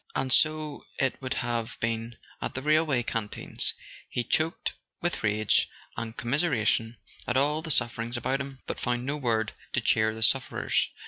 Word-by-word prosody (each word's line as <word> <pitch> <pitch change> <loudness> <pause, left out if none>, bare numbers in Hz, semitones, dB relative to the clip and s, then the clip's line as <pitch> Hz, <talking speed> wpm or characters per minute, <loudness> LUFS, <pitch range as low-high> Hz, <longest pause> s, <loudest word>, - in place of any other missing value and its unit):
And 130 -1 +1
so 155 -1 +3
it 135 0 0
would 130 -1 -2
have 120 -1 -2
been 115 0 -2 0.2
at - - -3
the 130 - -3
railway 150 -4 +3
canteens; 115 -3 -2 0.3
he 120 - -1
choked 160 +6 0 0.3
with 175 0 -1
rage 110 0 +3 0.3
and 115 -1 -5
commiseration 120 -4 +1 0.3
at 120 - +2
all 150 +3 +2
the 160 - -7
suffering 120 -3 +1
about 130 +3 0
him, 135 -1 -8
but - - -4
found 120 0 -1
no 140 +2 -1
word 115 -6 0 0.2
to - - +3
cheer 110 0 +2
the 110 - 0
sufferers. 130 +3 +2
120 Hz, 165 wpm, -28 LUFS, 115-140 Hz, 0.3 s, so